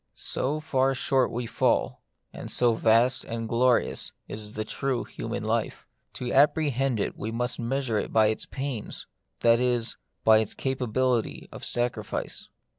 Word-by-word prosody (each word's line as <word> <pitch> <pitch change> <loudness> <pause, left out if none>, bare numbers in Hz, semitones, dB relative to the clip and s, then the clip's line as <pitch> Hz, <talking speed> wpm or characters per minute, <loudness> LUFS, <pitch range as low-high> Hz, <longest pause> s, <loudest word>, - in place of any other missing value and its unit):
So 145 +4 -2
far 135 -3 +1
short 130 0 +2
we 120 +1 -3
fall; - - +1 0.3
and - - -7
so 120 -2 +3
vast 115 +3 +3
and 115 0 -4
glorious 120 +2 +2
is 105 0 -6
the 110 - -3
true 135 -3 -2
human - - -5
life. - - -1 0.3
To 125 -1 -4
ap 140 +3 +5
prehend 135 -6 0
it - - -1
we 110 - -4
must 120 +2 -2
measure 120 -2 0
it - - -4
by 110 -1 +5
its 110 - -2
pains, 135 -5 -5 0.4
that 115 0 +5
is, 125 -2 0 0.3
by 110 -1 +7
its 110 - -2
capability 130 -2 -1
of - - -9
sacrifice. 120 0 -3
120 Hz, 155 wpm, -27 LUFS, 115-130 Hz, 0.4 s, by